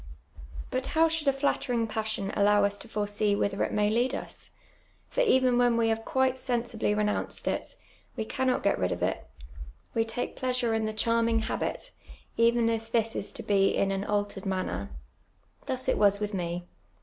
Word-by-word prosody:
liut 255 - -1
how 325 +1 +4
should 320 -2 -2
a - - +7
flattering; 270 -3 0
pa.ssion 220 -3 -3
allow 205 0 +4
us 200 0 +2
to 205 - -10
foresee 205 -1 0
whither 200 -1 0
it - - -1
may 210 0 +2
lead 240 +5 +1
us? - - -7 0.6
For - - 0
even 260 - +4
when 245 -1 +3
we 230 -1 +2
have 225 0 -1
quite 260 +1 +1
sen 245 -2 -1
sibly 225 -3 -1
renounced 210 0 -1
it, - - -2 0.4
we 220 - -2
cannot 255 +3 0
^et 200 - +2
rid 90 -1 0
of - - -2
it; - - -1 0.7
we 225 - +2
take 225 +2 -4
jjleasure 250 -3 0
in 220 -1 0
tlie 215 0 -5
charmin«j; 230 0 +2
habit, - - -3 0.4
even 230 0 +3
if 225 0 -2
this 225 -1 +1
is 200 - -2
to - - -5
be 195 -1 +2
in 195 - +2
an 195 0 -1
altered 205 -1 -2
manner. 100 - -2 0.8
Thus 260 0 -3
it - - +2
was 200 -1 +4
with 210 0 -3
me. 175 -1 -3
225 Hz, 185 wpm, -28 LUFS, 205-245 Hz, 0.8 s, a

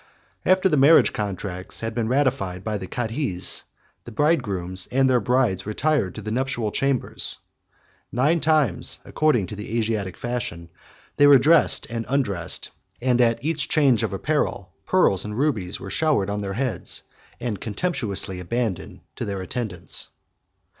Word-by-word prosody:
After 185 0 +5
the 155 -5 +2
marriage 155 +4 +6
contracts 95 -2 -5
had 115 0 -3
been 115 -1 -1
ratified 120 -9 0
by 105 -2 -2
the 95 - -6
cadhis, 115 -5 -3 0.4
the 120 - -10
bride 150 +8 +3
grooms 95 -2 -3
and 135 +1 +3
their 125 -1 +4
brides 115 -5 +1
retired 130 - 0
to 110 - -7
the 110 - -4
nuptial 120 -3 -1
chambers: 135 +1 -1 0.7
nine 145 +8 +2
times, 150 - +2
according 150 -10 +2
to 100 - -7
the 105 +3 -4
Asiatic 105 -5 -1
fashion, 95 -9 -4 0.5
they 145 - +7
were 140 -1 +9
dressed 155 +6 +4
and 115 -1 -3
undressed; 105 -11 -1 0.3
and 125 0 +2
at 115 +2 +2
each 155 -3 -1
change 135 -7 +4
of - - -1
apparel, 100 - -1 0.2
pearls 100 - +3
and 105 +1 -5
rubies 115 -10 -1
were 95 - -7
showered 140 -8 +1
on 105 0 -2
their 100 -1 -3
heads, 120 -4 -2 0.4
and 115 -4 -3
contemptuously 105 - -1
abandoned 110 +2 -3 0.2
to - - -3
their 100 -2 -3
attendants. 90 -5 -3
115 Hz, 155 wpm, -24 LUFS, 100-135 Hz, 0.7 s, were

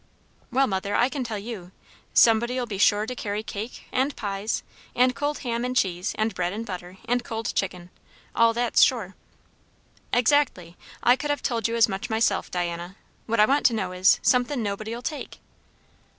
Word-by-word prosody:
"Well, 270 +2 +3
mother, 200 -2 -2
I 245 - +3
can 270 0 -3
tell 225 -3 -4
you. 200 -4 -7 0.4
Somebody'll 240 +2 +4
be 205 -5 -5
sure 205 +1 +4
to 250 - -4
carry 210 -3 -3
cake, 220 +2 -6
and 270 +3 0
pies, 205 0 -3 0.3
and 250 +1 +3
cold 290 +1 -1
ham 235 0 -1
and 250 0 -2
cheese, 185 -4 0
and 220 0 0
bread 180 0 -2
and 225 +2 -4
butter, 180 -2 -7
and 245 +1 0
cold 225 -1 -4
chicken. 180 -2 -3 0.4
All 230 0 +4
that's 235 0 +2
sure." 215 -7 +3 1.0
"Exactly. 245 - +2 0.3
I 245 - +6
could 295 +3 -5
have 290 - -1
told 230 -4 0
you 230 - -2
as 230 - +5
much 195 -2 -4
myself, 220 -3 +1
Diana. 175 +1 -3 0.3
What 230 0 0
I 210 - +8
want 280 +5 +2
to 240 - 0
know 190 -4 -2
is, 185 +1 +4
somethin' 250 0 +2
nobody'll 215 +4 -4
take." 300 +2 -5
225 Hz, 180 wpm, -25 LUFS, 195-245 Hz, 1.0 s, I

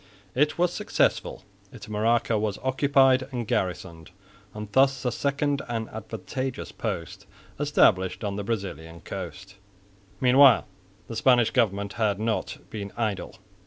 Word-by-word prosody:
It 150 +4 +1
was 175 0 +2
successful. - - 0 0.3
Itamaraca 110 +1 0
was 105 -2 -2
occupied 135 0 +4
and 120 -4 -4
garrisoned, 85 -3 -3 0.4
and 105 +1 -7
thus 135 +2 +3
a 125 - +1
second 140 +2 -1
and 115 -2 -3
advantageous 110 +5 -5
post 95 -7 -5 0.3
established 100 -11 +3
on 100 -1 -2
the 100 - -3
Brazilian 95 -6 -5
coast. 95 +4 -8 0.6
Meanwhile 130 +1 +6 0.4
the 115 - -6
Spanish 120 0 +4
government 100 -5 0
had 105 -2 +1
not 110 0 -2
been 100 -2 -6
idle. 110 -4 -2
110 Hz, 125 wpm, -26 LUFS, 100-130 Hz, 0.6 s, Meanwhile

